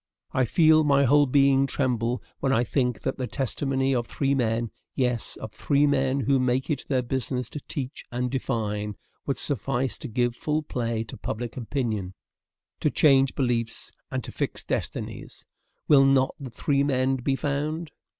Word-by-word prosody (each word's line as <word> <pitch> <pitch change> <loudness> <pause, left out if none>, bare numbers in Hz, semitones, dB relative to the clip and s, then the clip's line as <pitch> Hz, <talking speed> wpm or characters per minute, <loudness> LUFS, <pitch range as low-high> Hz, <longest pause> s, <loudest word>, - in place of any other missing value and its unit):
I 130 - +2
feel 155 +3 +5
my 140 -1 +4
whole 145 +2 +5
being 135 0 +4
tremble 125 -3 -1 0.2
when 135 - +1
I 120 -2 +3
think 125 -2 -1
that - - -2
the 130 - -2
testimony 135 0 -1
of 120 -2 -1
three 140 -1 0
men 115 -3 0 0.2
yes, 125 -4 -1
of 110 - -7
three 140 +7 +2
men 135 -1 +2
who 135 +2 +2
make 130 +4 0
it 140 - -1
their 130 -3 +1
business 125 0 -2
to 150 - -6
teach 135 0 -5
and 125 0 -2
define 105 -5 -2 0.3
would 140 - 0
suffice 135 -1 0
to 150 - -6
give 120 +1 0
full 155 +3 -1
play 115 -5 -2
to 115 - -9
public 115 0 -4
opinion, 110 -7 -3 0.6
to - - +2
change 135 -3 +4
beliefs, 115 -3 -1 0.2
and - - -3
to - - -6
fix - - -2
destinies. - - -4 0.4
Will 135 -2 +7
not 135 -1 +3
the 135 -3 -6
three 140 +4 0
men 135 -1 +1
be 135 +2 0
found?... 150 +3 -2
130 Hz, 170 wpm, -26 LUFS, 120-140 Hz, 0.6 s, Will